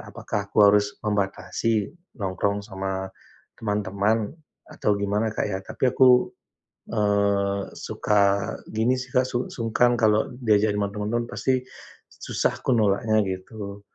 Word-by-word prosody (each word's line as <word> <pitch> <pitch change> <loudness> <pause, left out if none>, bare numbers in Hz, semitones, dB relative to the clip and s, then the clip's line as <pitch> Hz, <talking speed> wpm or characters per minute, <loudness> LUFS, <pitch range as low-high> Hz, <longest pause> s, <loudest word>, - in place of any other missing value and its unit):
apakah 100 -1 -4
aku - - -3
harus 105 0 +2
membatasi 105 +1 -1 0.3
nongkrong 100 +1 -1
sama, 95 -2 -4 0.5
teman-teman, 105 0 0 0.3
atau 105 -1 -1
gimana 105 +2 0
Kak, - - -1
ya, 95 -2 -2
tapi 130 +5 0
aku, 125 -1 +6 0.7
eee, 100 -2 +1
suka 100 -1 +1 0.2
gini 115 +4 +1
sih 130 0 -8
Kak, 125 - +5
su 125 0 -2
sungkan 120 +1 +2
kalau 110 -1 +3 0.2
diajak 105 -1 +3
ma 100 -1 0
teman 105 0 -3
teman 120 0 +1
pasti, 130 -1 0 0.5
susah - - -1
aku - - -1
nolaknya 110 0 +2
gitu. 100 +2 -6
105 Hz, 130 wpm, -24 LUFS, 100-115 Hz, 0.7 s, aku